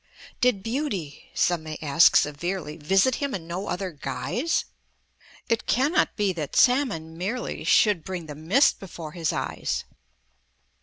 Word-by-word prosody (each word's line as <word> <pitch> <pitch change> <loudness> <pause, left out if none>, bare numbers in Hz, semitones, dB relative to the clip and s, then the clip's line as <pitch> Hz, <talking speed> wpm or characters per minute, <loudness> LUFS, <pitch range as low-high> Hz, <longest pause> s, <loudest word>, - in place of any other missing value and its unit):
"Did 245 -6 +2
Beauty," 225 - -4
some 175 -2 +2
may 155 -1 -6
ask 155 +2 +5
severely, 150 +1 0
"Visit 195 - +2
him 280 -4 -2
in 170 -4 -6
no 175 +4 -5
other 185 0 -3
guise? 150 - -2 0.8
It 230 -1 -1
cannot 280 +8 +2
be 205 -3 +1
that 155 -5 -5
salmon 235 - +2
merely 225 +7 -3
Should 205 -7 +4
bring 180 -2 -5
the 150 - -7
mist 165 - +3
before 165 -5 -8
his 165 -2 -1
eyes! - - -2
185 Hz, 140 wpm, -25 LUFS, 160-230 Hz, 0.8 s, ask